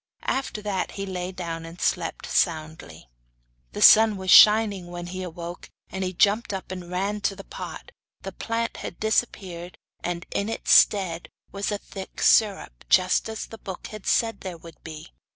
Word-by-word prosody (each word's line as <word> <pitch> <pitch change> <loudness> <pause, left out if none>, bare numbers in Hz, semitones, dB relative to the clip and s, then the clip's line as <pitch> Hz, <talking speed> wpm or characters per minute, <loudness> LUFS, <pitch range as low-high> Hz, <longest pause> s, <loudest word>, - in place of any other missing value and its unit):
After 260 -5 -2
that 195 -3 -2
he 195 - -5
lay 185 -1 -4
down 170 -3 -5
and 165 +2 -11
slept - - -1
soundly. 155 - -2 0.7
The - - 0
sun 220 -1 +8
was 190 0 -1
shining 210 -4 +7
when 175 0 -7
he 185 +1 -6
awoke, 175 -1 -8 0.2
and 190 +1 -3
he 185 - -2
jumped 205 +4 +2
up 190 -1 -6
and 180 -2 -7
ran 200 +3 -2
to 200 - 0
the 195 - -10
pot. 485 - -9 0.3
The - - -5
plant 230 0 -3
had - - -7
disappeared 190 -6 -2 0.3
and 175 0 -3
in 200 +2 -2
its 225 - -2
stead 180 -5 +4 0.2
was 200 +1 -3
a 205 - -1
thick 195 -1 -10
syrup, 205 -3 +2
just 185 +4 +3
as 220 - -5
the 225 - -12
book 190 -2 -8
had 215 -2 -9
said 225 -1 +1
there 185 -3 -6
would 165 -1 -15
be. 155 -2 -9
190 Hz, 175 wpm, -25 LUFS, 175-210 Hz, 0.7 s, sun